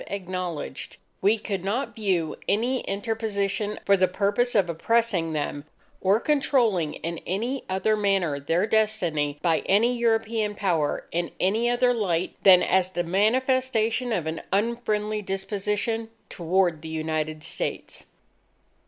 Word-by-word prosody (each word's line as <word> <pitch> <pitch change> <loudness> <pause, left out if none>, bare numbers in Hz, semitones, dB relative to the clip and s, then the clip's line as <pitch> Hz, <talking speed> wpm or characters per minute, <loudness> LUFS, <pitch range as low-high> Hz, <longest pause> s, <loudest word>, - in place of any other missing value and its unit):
acknowledged, 180 - -5 0.2
we 210 +3 +4
could 200 -4 -4
not 225 +8 -2
view 185 -8 0
any 240 +5 +1
interposition 205 0 -2
for 200 - +5
the 185 -1 +3
purpose 205 +6 0
of 195 -4 +4
oppressing 180 -1 0
them, 145 -1 -3 0.4
or 195 +3 +3
controlling 235 - +1
in 170 0 -5
any 235 +9 -2
other 190 +3 +1
manner 195 -8 +1
their 165 +7 +1
destiny 180 -10 0
by 165 -3 +3
any 230 +5 +3
European 225 -2 0
Power, 165 -8 0
in 170 0 -1
any 220 +6 +2
other 245 +1 +3
light 185 -7 -1
than 185 -2 +7
as 185 -1 +2
the 175 -1 -2
manifestation 235 +4 +1
of 180 -8 -1
an 160 +1 -3
unfriendly 215 0 0
disposition 210 +3 -2 0.2
toward 175 -2 0
the 160 - -8
United 155 -1 -3
States. - - -4
200 Hz, 130 wpm, -25 LUFS, 175-225 Hz, 0.4 s, than